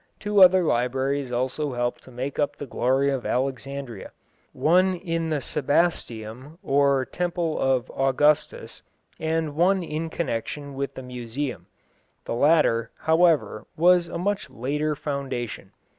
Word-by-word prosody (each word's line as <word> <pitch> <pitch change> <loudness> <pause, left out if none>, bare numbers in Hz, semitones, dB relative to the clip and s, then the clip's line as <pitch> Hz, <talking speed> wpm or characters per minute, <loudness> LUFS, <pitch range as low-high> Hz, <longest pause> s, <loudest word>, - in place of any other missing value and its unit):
Two 210 -1 +2
other 185 0 +7
libraries 130 0 0
also 130 +3 -2
helped 120 0 -2
to - - -13
make 130 +3 -5
up 145 - 0
the 145 - -7
glory 135 +2 +1
of 130 -3 -2
Alexandria; 135 -3 -3 0.4
one 185 +3 +3
in 165 -2 -3
the 155 -2 0
Sebasteum, 135 -3 -1
or 140 -1 +2
Temple 175 -1 -2
of 130 -2 +1
Augustus, 135 +3 +1 0.4
and 160 -2 -1
one 185 +3 +3
in 160 0 -4
connection 145 -1 -4
with 140 +1 -4
the 130 - -7
Museum. 125 +2 -5 0.6
The - - -3
latter, 120 -4 +3
however, 160 - +2
was 175 +1 +4
a - - -5
much 205 +3 -2
later 150 +5 -2
foundation. 135 -8 -4
140 Hz, 130 wpm, -25 LUFS, 130-165 Hz, 0.6 s, other